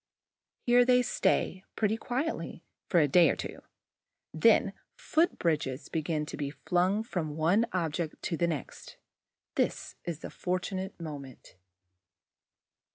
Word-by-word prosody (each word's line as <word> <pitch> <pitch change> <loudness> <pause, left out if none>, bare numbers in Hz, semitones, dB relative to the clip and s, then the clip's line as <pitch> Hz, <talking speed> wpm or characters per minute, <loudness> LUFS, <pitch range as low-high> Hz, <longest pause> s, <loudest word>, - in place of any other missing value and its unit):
Here 245 0 +6
they 250 0 +4
stay, 190 -5 +1
pretty 215 0 +1
quietly, 260 +7 -3 0.3
for 175 - +4
a 150 - +4
day 170 +4 +6
or - - +1
two; - - -6 0.7
then - - +4 0.2
foot 345 0 +1
bridges 155 -5 -1
begin 155 -1 -1
to - - -6
be 145 -1 -2
flung 180 +7 +1
from 160 -9 -3
one 185 +9 +3
object 165 -2 -2
to 170 - -1
the 170 +1 +1
next. 155 -5 -5 0.6
This - - -1
is 165 -2 -5
the - - -7
fortunate 185 +1 -3
moment. 145 -5 -8
175 Hz, 130 wpm, -30 LUFS, 155-215 Hz, 0.7 s, Here